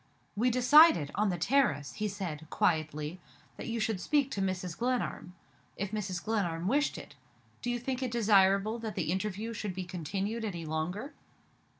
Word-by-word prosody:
"We 235 +5 +2
decided, 250 - +6
on 210 0 +1
the 180 - -1
terrace," 225 - +1
he 215 - -2
said, 170 -6 -5
quietly, 155 0 0 0.4
"that - - -7
you 230 0 -2
should 215 -4 -1
speak 285 +1 +1
to 200 - -2
Mrs. 185 -2 -2
Glenarm, 240 -7 -2 0.4
if 200 0 -3
Mrs. 190 -5 -3
Glenarm 180 -6 -1
wished 290 +6 +1
it. - - -10 0.5
Do 245 - -3
you 245 - 0
think 255 +2 -3
it 255 - -1
desirable 210 -1 +3
that 220 -2 -5
the - - -1
interview 210 +4 -2
should 205 -4 -4
be 190 - -3
continued 190 +6 -3
any 175 -6 -4
longer?" 175 - -3
205 Hz, 170 wpm, -31 LUFS, 180-235 Hz, 0.5 s, decided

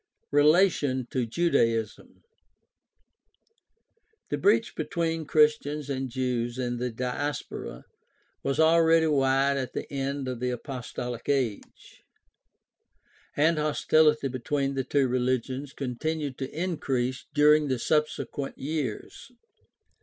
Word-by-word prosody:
Relation 145 -3 +3
to 125 -3 -1
Judaism. 115 -7 0 1.0
— 450 -1 -44
The - - 0
breach 410 - +2
between 165 -3 -2
Christians 150 -1 +2
and 135 -1 -3
Jews 125 -1 -2
of 120 -1 -2
the 125 0 -1
Diaspora 125 +4 -4 0.6
was 140 +1 -2
already 165 0 +5
wide 140 -2 +2
at 130 -2 -4
the - - -4
end 135 0 -2
of 125 -2 -4
the 125 +1 -1
Apostolic 125 -1 -5
Age, 130 -7 -3 1.4
and 155 +2 +3
hostility 150 -1 +3
between 135 +2 -2
the 135 -1 -1
two 135 0 +1
religions 130 +2 -1
con 125 -4 -5
tinued 155 -3 -2
to 135 -1 -4
increase 135 -7 -2
during 150 0 +5
the 130 -2 0
subsequent 150 0 -1
years. 145 - -5
140 Hz, 110 wpm, -27 LUFS, 125-155 Hz, 1.4 s, already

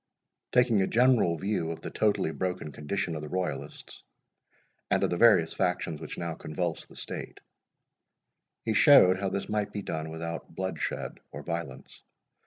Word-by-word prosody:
Taking 120 -5 +4
a 95 - +2
general 120 -8 +3
view 95 -2 -1
of 85 - -5
the - - -6
totally 105 -6 +1
broken 90 -3 -3
condition 80 +4 -3
of 75 - -4
the 75 - -7
Royalists, 90 -6 -4 0.9
and - - +2
of - - +1
the - - +1
various 85 -8 +5
factions 90 -3 -1
which - - -7
now 85 -1 -3
convulsed 80 +1 -4
the - - -15
state, - - -6 1.3
he 110 - +1
showed 95 - +7
how 100 -1 -1
this 100 - -3
might 105 -1 -1
be 100 - -5
done 80 -2 -4
without 85 +1 -6
bloodshed 95 +1 -3
or - - -8
violence. 85 0 -6
90 Hz, 160 wpm, -29 LUFS, 80-100 Hz, 1.3 s, showed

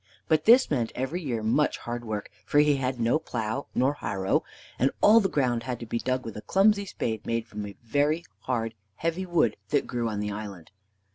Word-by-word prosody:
But 155 -1 +2
this 245 0 +6
meant 120 -6 0
every 135 +8 -2
year 120 -8 -2
much 130 +7 +2
hard 120 0 -5
work, 110 -2 -4
for - - 0
he 150 -1 +5
had 130 -1 -2
no 115 +6 +2
plow 120 0 -3
nor 130 +3 +3
harrow, 100 -7 0 0.4
and 135 - +4
all 220 +2 +7
the 195 -3 +1
ground 125 -6 +1
had 120 0 -4
to 115 - -6
be 115 +1 -2
dug 130 +1 -1
with 115 - -6
a 105 - -6
clumsy 200 - +3
spade, 110 - -3
made 115 -1 -1
from 105 -2 -6
a 100 - -10
very 145 +7 +1
hard, 115 -1 -2 0.2
heavy 165 - -2
wood 160 -11 +2
that - - +2
grew 120 -2 -2
on 105 -1 -3
the 105 0 -2
island. 100 -5 -7
125 Hz, 210 wpm, -27 LUFS, 110-150 Hz, 0.4 s, all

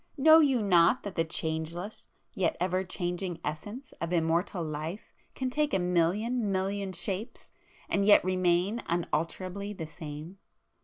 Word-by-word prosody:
Know 315 +3 +8
you 270 -7 +3
not 180 +3 +4
that 200 - -5
the 165 - +1
changeless, 160 +5 -4 0.3
yet 180 -3 0
ever 185 +1 0
changing 175 -1 -3
Essence 205 - -6
of 170 0 -2
Immortal 170 +2 +1
Life 155 +5 -5 0.2
can 260 -1 -2
take 300 +2 +1
a - - +4
million 195 +6 +1
million 195 +1 -1
shapes 190 +4 -3 0.4
and 200 - +1
yet 205 +1 +6
remain 185 +4 +1
unalterably 180 +4 -2
the 165 -5 -6
same? 155 +3 -9
185 Hz, 140 wpm, -29 LUFS, 170-205 Hz, 0.4 s, Know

